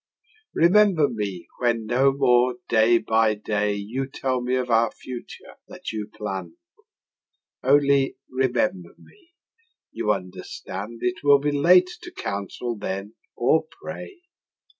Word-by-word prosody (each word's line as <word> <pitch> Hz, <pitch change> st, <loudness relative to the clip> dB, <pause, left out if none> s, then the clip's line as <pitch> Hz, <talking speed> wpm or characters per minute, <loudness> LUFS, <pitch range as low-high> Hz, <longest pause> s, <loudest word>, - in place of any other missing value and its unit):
Remember 180 Hz, -3 st, +5 dB
me 100 Hz, -7 st, -5 dB
when 115 Hz, -2 st, +1 dB
no 130 Hz, +4 st, +3 dB
more 125 Hz, -2 st, +3 dB
day 115 Hz, +1 st, +4 dB
by 110 Hz, -1 st, +2 dB
day 105 Hz, 0 st, -1 dB
You 115 Hz, +7 st, -4 dB
tell 130 Hz, -1 st, -2 dB
me 125 Hz, +1 st, 0 dB
of 125 Hz, -1 st, -1 dB
our 115 Hz, 0 st, +4 dB
future 125 Hz, +2 st, -10 dB
that -, -, -7 dB
you 105 Hz, -1 st, -5 dB
plann'd: 95 Hz, -5 st, -6 dB, 1.1 s
Only 140 Hz, 0 st, +3 dB
remember 120 Hz, -9 st, -1 dB
me; 365 Hz, -4 st, -22 dB, 0.6 s
you 105 Hz, -, 0 dB
understand 100 Hz, +3 st, -6 dB
It 185 Hz, -2 st, -1 dB
will 145 Hz, -1 st, +7 dB
be 145 Hz, +1 st, -1 dB
late 180 Hz, +5 st, +5 dB
to 350 Hz, -, -9 dB
counsel 100 Hz, -, -4 dB
then 100 Hz, 0 st, -5 dB, 0.2 s
or 155 Hz, +6 st, +2 dB
pray. 345 Hz, -, -8 dB
120 Hz, 125 wpm, -24 LUFS, 105-140 Hz, 1.1 s, will